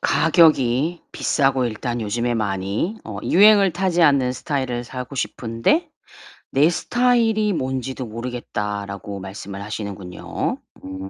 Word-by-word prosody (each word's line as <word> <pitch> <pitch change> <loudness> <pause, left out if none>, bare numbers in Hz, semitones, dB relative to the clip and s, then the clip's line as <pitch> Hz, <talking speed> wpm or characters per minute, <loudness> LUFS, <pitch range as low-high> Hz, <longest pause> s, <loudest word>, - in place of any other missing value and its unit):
"가격이 160 -2 +3
비싸고 135 -2 +1
일단 120 +1 -3
요즘에 120 +3 -1
많이 100 - -2
어 - - -6
유행을 200 0 +6
타지 175 -1 +1
않는 140 -5 +4
스타일을 130 -3 -3
사고 125 +2 -7
싶은데 115 - 0 0.6
내 145 +4 +4
스타일이 225 0 +2
뭔지도 130 -3 -3
모르겠다."라고 105 -4 -5
말씀을 100 +1 -7
하시는군요. 100 -3 -4 0.3
음 95 0 -7
125 Hz, 285 characters per minute, -22 LUFS, 105-165 Hz, 0.6 s, 유행을